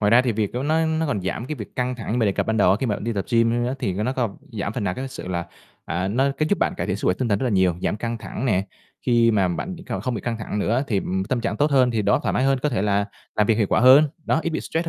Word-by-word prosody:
Ngoài 105 -1 +2
ra 120 +3 +6
thì 125 -2 0
việc 105 -2 -1
đó 125 - -2
nó 160 +3 +2
nó 160 0 0
còn 105 -8 -1
giảm 100 +6 -3
cái 155 - -3
việc 110 -8 -9
căng 125 0 -1
thẳng 120 0 -3
mình 115 - +2
đề 100 - +2
cập - - -1
ban 110 0 0
đầu 105 - +4
á, 95 - +4
khi 130 - 0
mà 105 - 0
mình - - -6
đi 115 - -1
tập 100 -3 -2
gym 115 -1 +3 0.2
á, 125 - -1
thì 100 -9 -2
cái 105 +3 -2
nó 130 - 0
không 120 -6 -2 0.2
giảm 100 -2 -3
phần 110 -3 -3
nào 90 - -1
cái 135 +5 -5
sự 130 -8 -8
là, 85 -2 -2 0.4
à, 90 +2 -2
nó 130 +7 +2
cái 155 - +1
giúp 205 - +1
bạn - - +1
cải - - -2
thiện - - -1
sức - - -4
khỏe 90 - +3
tinh 125 - 0
thần 100 - +2
rất 130 - -2
là 125 - +1
nhiều, 95 -4 +2
giảm - - 0
căng 115 +1 -3
thẳng 110 - -6
nè, 95 -5 +1 0.4
khi 120 -1 +4
mà 100 -4 +2
bạn 175 - -4
đ - - -11
cao - - -3
không 130 -2 -2
bị 105 - -3
căng 115 +1 -3
thẳng 105 -1 -4
nữa 115 +7 +1
thì, 105 -6 0
ừm, 95 +1 -2
tâm 120 +4 -1
trạng 105 -2 -2
tốt 150 +1 +2
hơn 130 -3 +4
thì 115 -3 0
đầu - - +2
óc - - +2
thoải - - 0
mái 130 - +1
hơn, 135 0 +3
có 150 - +2
thể 120 -8 -1
là 100 -1 +2 0.3
làm 105 - +3
việc 110 0 +2
hiệu 105 - +3
quả - - +2
hơn, 130 +5 +8 0.2
đó, 160 - +1
ít 170 - -1
bị 160 - -2
stress 165 +1 -2
115 Hz, 355 wpm, -23 LUFS, 100-130 Hz, 0.4 s, hơn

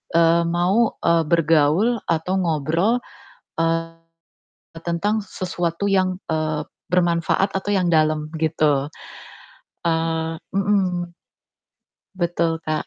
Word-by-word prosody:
eee, 170 0 +4
mau, 180 +7 +2
eee, 170 -1 +4
bergaul 165 +7 +3
atau 165 +3 0
ngobrol, 170 - +1 0.6
eee, 165 0 0 0.9
tentang 200 +6 0
sesuatu 180 0 -3
yang, 185 -1 +2
eee, 155 -1 -1 0.3
bermanfaat 175 +2 +2
atau 195 - -7
yang 180 -3 +2
dalam 155 -1 +2
gitu. 150 -3 +1 1.0
Eee 165 0 -1 0.2
mhm. 185 -3 0 1.0
Betul, 170 -2 -1
Kak. 155 -1 -2
170 Hz, 95 wpm, -22 LUFS, 160-185 Hz, 1.0 s, eee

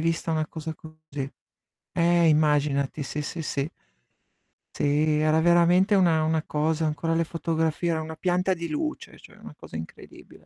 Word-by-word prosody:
vista 165 +1 -1
una 155 -1 0
cosa 160 0 -6
così. 155 -3 -8 0.6
Eh, 170 -1 +4
immaginati, 150 -2 +2
sì 150 +2 -4
sì 160 - -5
sì. 140 -1 -2 1.1
Si, - - -1 0.3
era 155 +1 +3
veramente 175 +4 +4
una 170 -5 +3
una 160 0 0
cosa 160 +1 0
ho - - +2
ancora 160 +2 -1
le 165 0 +1
fotografie, 165 0 -1
era 160 - 0
una 160 0 -7
pianta 180 +3 +1
di 170 -1 -5
luce, 310 0 -4
cioè - - -16
una - - -11
cosa - - -13
incredibile - - -10
160 Hz, 160 wpm, -26 LUFS, 155-170 Hz, 1.1 s, Eh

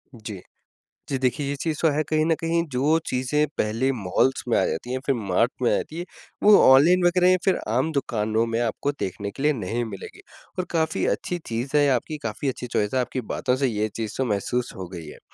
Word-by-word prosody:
जी। 105 -4 -8 0.7
जी, 135 - 0
देखिए 135 +2 0
ये 145 - -1
चीज़ 160 -2 -1
तो 165 - +4
है, 150 +2 +1
कहीं 155 0 +1
न 165 0 +2
कहीं 170 0 0
जो 140 +5 +2
चीज़ें 130 +4 +1
पहले 115 +5 +1
मॉल्स 120 +3 0
में - - +2
आ - - +3
जाती 120 +10 -3
हैं, 130 - -1
फिर 135 - +2
मार्ट 110 +2 +1
में 120 - +3
आ - - +3
जाती 155 - -4
हैं, 175 - -4 0.4
वो 210 0 +8
ऑनलाइन 160 +8 +6
वगैरह 180 +1 +4
या 185 - +4
फिर 190 - +3
आम 130 +8 +1
दुकानों 110 -6 0
में 115 0 -1
आपको 120 +5 -1
देखने 100 +2 -4
के 135 - -7
लिए 150 - +4
नहीं 115 0 -2
मिलेंगी। 100 -4 -9 0.4
और 180 - 0
काफ़ी 160 -2 0
अच्छी 180 - -4
चीज़ 120 +5 -3
है, 145 -1 +4
आपकी 135 +5 -1
काफ़ी 125 +6 -2
अच्छी 125 -1 -5
चॉइस 105 0 -1
है 130 - +2
आपकी 125 +1 -3
बातों 125 - 0
से 135 - +4
ये 110 -2 -1
चीज़ 110 -2 -4
तो 130 - 0
महसूस 120 +3 -1
हो 95 -2 -6
गई 85 -2 -7
हैं। - - -11
130 Hz, 225 wpm, -24 LUFS, 110-150 Hz, 0.7 s, वो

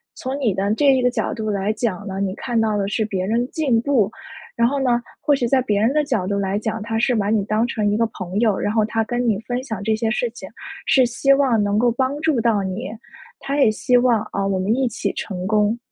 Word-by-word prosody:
从 260 +1 -4
你 235 -8 +1
的 195 +2 0
这 275 +1 +4
个 255 - 0
的 250 - +4
角 - - -2
度 220 -2 -4
来 200 +1 0
讲 210 -4 -3
呢， 190 0 -4
你 195 -1 -1
看 240 0 -2
到 220 -1 +1
的 200 -1 -1
是 215 +2 -1
别 195 -3 -2
人 235 +4 0
进 280 -8 +1
步， 240 -7 +2 0.5
然 235 0 +3
后 280 +3 -1
呢， 245 -2 +2 0.2
或 290 - +3
许 245 -3 -1
在 260 +2 +3
别 210 -5 0
人 225 +4 +3
的 300 0 +2
角 240 -10 -1
度 200 0 -1
来 195 0 -1
讲， 220 +1 -3
他 225 +1 -3
是 245 +3 +2
把 205 -2 0
你 215 -2 +2
当 215 +3 +1
成 215 -3 -1
一 - - +1
个 230 0 +2
朋 190 -2 -5
友， 215 -4 +2
然 205 - -1
后 220 -1 +3
他 225 +1 -1
跟 240 +2 -2
你 210 -4 +1
分 245 +1 -2
享 220 -7 -5
这 220 +1 +1
些 220 +1 -1
事 240 +1 0
情， 210 -5 -10 0.4
是 265 -4 +5
希 245 +3 +2
望 265 -6 +2
能 205 0 0
够 240 +1 +3
帮 260 +4 -1
助 310 -5 +1
到 220 -3 +2
你。 195 +6 -4 0.5
他 280 +1 -3
也 270 - +5
希 250 +4 0
望 245 -3 +3
啊， 195 - -1
我 195 -1 0
们 195 +4 +1
一 265 0 +1
起 230 - -2
成 185 -3 -5
功。 210 +2 +2
225 Hz, 280 characters per minute, -21 LUFS, 205-250 Hz, 0.5 s, 是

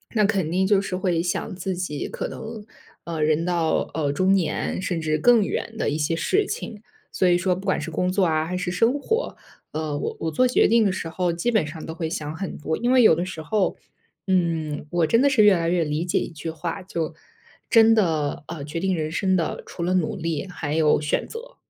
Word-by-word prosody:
那 210 -2 +4
肯 195 -6 0
定 185 +3 +1
就 195 0 +3
是 195 -2 -4
会 180 -3 0
想 175 +1 -2
自 190 0 -3
己 175 -5 -3
可 - - -4
能， 220 -1 -8 0.4
呃， 165 -2 -4
人 155 +2 +2
到， 170 -2 0
呃， 150 -3 0
中 185 +6 +2
年 180 -1 -1
甚 180 -3 -2
至 155 -1 0
更 230 +7 +5
远 225 +3 -3
的 - - 0
一 145 - -1
些 160 +2 0
事 385 - +1
情。 225 - -5 0.3
所 185 - +2
以 175 -1 +4
说 180 +1 +1
不 190 +2 -8
管 190 - +1
是 170 - -5
工 180 +3 0
作 190 +1 +2
啊 155 -2 +1
还 180 +3 -4
是 180 -1 -2
生 230 +9 +2
活， 450 - -1 0.4
呃， 155 -2 -2
我 - - -3
我 160 - -1
做 255 +12 +3
决 250 - +4
定 230 -1 +4
的 195 - +3
时 180 -3 -4
候 175 +1 -1
基 170 +8 -1
本 215 -9 +2
上 155 0 -8
都 160 - -6
会 160 -1 -3
想 155 -2 -4
很 195 +2 -5
多， 160 +1 -2
因 240 +2 0
为 255 -1 +6
有 220 - +7
的 175 +3 -2
时 185 -4 -6
候， 200 +4 0 0.5
嗯， 165 -5 0
我 175 0 +2
真 230 +9 +3
的 280 - +5
是 255 -6 +4
越 210 -1 +7
来 165 -1 -1
越 175 0 +2
理 150 +2 -2
解 175 - +1
一 - - -4
句 160 0 -6
话， 165 +2 -4
就 170 -4 -4 0.6
真 225 -1 +6
的， 160 -9 0
呃， 150 -4 -6
决 150 +3 -4
定 190 +1 0
人 155 -2 -2
生 190 +2 +1
的， 165 -4 -1
除 170 - -6
了 180 +2 +1
努 180 -4 0
力 165 0 -3
还 160 -5 -4
有 155 -2 +3
选 150 - -1
择。 - - -9
175 Hz, 255 characters per minute, -24 LUFS, 160-195 Hz, 0.6 s, 有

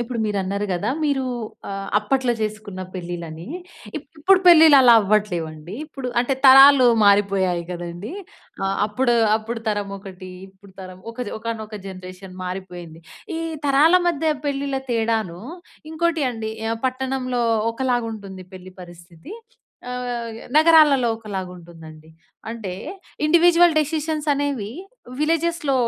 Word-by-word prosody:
ఇప్పుడు 240 0 -6
మీరు 205 -1 -2
అన్నరు 200 +2 -3
గదా! 185 +6 -2
మీరు 280 -3 0 0.5
ఆహ్, 195 0 -5
అప్పట్లో 250 +4 0
జెసుకున్న 215 -3 -5
పెళ్లిలు 175 -1 -6
అని. 160 +5 -10 0.5
ఇప్పుడు 310 +6 +1
పెళ్లిలు 320 -4 +8
అలా 245 -2 +7
అవ్వట్లేదండి. 180 -5 -2
ఇప్పుడు 270 -4 -7
అంటే 250 +3 0
తరాలు 270 0 +8 0.2
మారిపోయాయి 195 -3 +2
గదండీ. 175 - -7 0.5
ఆహ్, 195 - -1
అప్పుడు, 240 +3 0 0.2
అప్పుడు 225 +1 -6
తరం 205 -1 -2
ఒకటి. 185 -2 -11 0.2
ఇప్పుడు 190 0 -20
తరం 185 0 -10
ఒక 240 - -23
జన్ - - -6
ఒకానొక 220 -1 -6
జనరేషన్ 185 0 -10
మారిపోయింది. 180 -3 -8 0.3
ఈ - - -3 0.3
తరాల 285 +5 +4
మధ్య 320 -1 0
పెళ్లిల 275 -1 -2
తేడాను 220 -6 -1 0.5
ఇంకోటి 325 -2 0
అండి 220 -2 -5 0.2
ఆహ్, 225 - -2
పట్టణంలో 255 -1 -2 0.3
ఒకలాగా 245 -1 -1
ఉంటుంది 195 -3 -10
పెళ్లి 185 0 -11
పరిస్థితి. 175 - -13 0.6
ఆహ్, 250 -1 -4 0.2
య్ - - -12 0.2
నగరాలలో 310 -6 +5
ఒకలాగా 195 -4 -6
ఉంటుంది 170 -1 -14
అండి. 155 0 -16 0.4
అంటే 225 -5 -6 0.5
ఇండివిడ్యువల్ 345 +2 +5
డెసిషన్స్ 310 0 -2
అనేవి 280 -7 -2 0.5
విల్లెజెస్‌లో 325 -1 0
225 Hz, 130 wpm, -21 LUFS, 185-275 Hz, 0.6 s, పెళ్లిలు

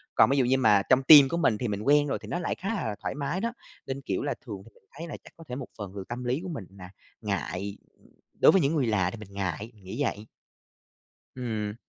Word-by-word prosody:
Còn - - +6
ví 140 - +2
dụ 130 - +3
như 130 +2 +3
mà 105 -6 +5
trong 130 +1 +5
team 140 -1 +9
của 170 - -1
mình 120 -10 +2
thì 120 - -2
mình 105 -1 -3
quen 145 +5 +4
rồi 140 - -2
thì - - -10
nó 175 - -2
lại 175 - -2
khá 195 - -5
là 110 - -3
thoải - - -3
mái 145 +6 -2
đó, 235 +2 -2 0.3
nên, 135 +1 -4
kiểu, 100 -8 -2
là - - -1
thường 105 -6 -7
thì - - -15
mình - - -26
thấy 170 - -6
là 150 - -7
chắc - - -16
có 165 - -12
thể 125 - -4
một 135 -1 -6
phần 100 -4 -6
từ 100 - -5
tâm 120 +1 -5
lý 125 +3 0
của 185 - -5
mình 145 - -5
là 90 -1 -10 0.3
ngại, 100 -1 -3 0.6
đối - - +8
với 195 - +4
những 145 +2 +1
người 140 -5 +2
lạ 95 -5 +1
thì - - -8
mình 105 -2 -11
ngại, 100 +3 -3
nghĩ 95 +10 -3
vậy. 105 -5 -3 1.1
Ừm. 110 -4 -3
125 Hz, 260 wpm, -27 LUFS, 105-145 Hz, 1.1 s, team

